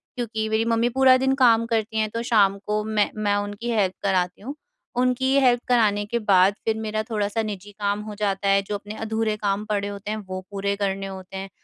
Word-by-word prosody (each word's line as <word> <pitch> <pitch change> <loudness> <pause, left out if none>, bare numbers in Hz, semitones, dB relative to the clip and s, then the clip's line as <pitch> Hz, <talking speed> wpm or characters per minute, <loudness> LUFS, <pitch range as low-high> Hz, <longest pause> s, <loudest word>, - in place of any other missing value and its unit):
क्योंकि 225 -3 -3
मेरी 220 +1 +1
मम्मी 230 +1 +2
पूरा 260 +1 +5
दिन 265 +1 +1
काम 230 -1 +5
करती 220 -1 -1
हैं, 215 -1 0
तो 230 +2 -4
शाम 200 -3 +4
को 210 0 0
मैं 215 -1 +1
मैं 205 -1 0
उनकी 205 +3 -3
हेल्प 195 -4 +1
कराती 180 -2 0
हूँ। 270 +7 -6 0.5
उनकी 255 +1 +1
हेल्प 245 -2 +3
कराने 210 -4 +2
के 235 +3 -2
बाद 195 -2 +4
फिर 220 -1 +1
मेरा 215 0 -2
थोड़ा-सा 210 0 -1
निजी 205 -1 -6
काम 205 0 -1
हो 210 - -7
जाता 200 -1 -1
है, 195 0 +4
जो 200 +1 -5
अपने 205 +1 -7
अधूरे 220 -1 -1
काम 205 0 -1
पड़े 205 -2 -1
होते 205 +1 -6
हैं, 215 - -2
वो 185 -2 -6
पूरे 200 0 -1
करने 195 -1 -2
होते 190 0 -8
हैं। 195 0 -6
210 Hz, 215 wpm, -24 LUFS, 200-225 Hz, 0.5 s, पूरा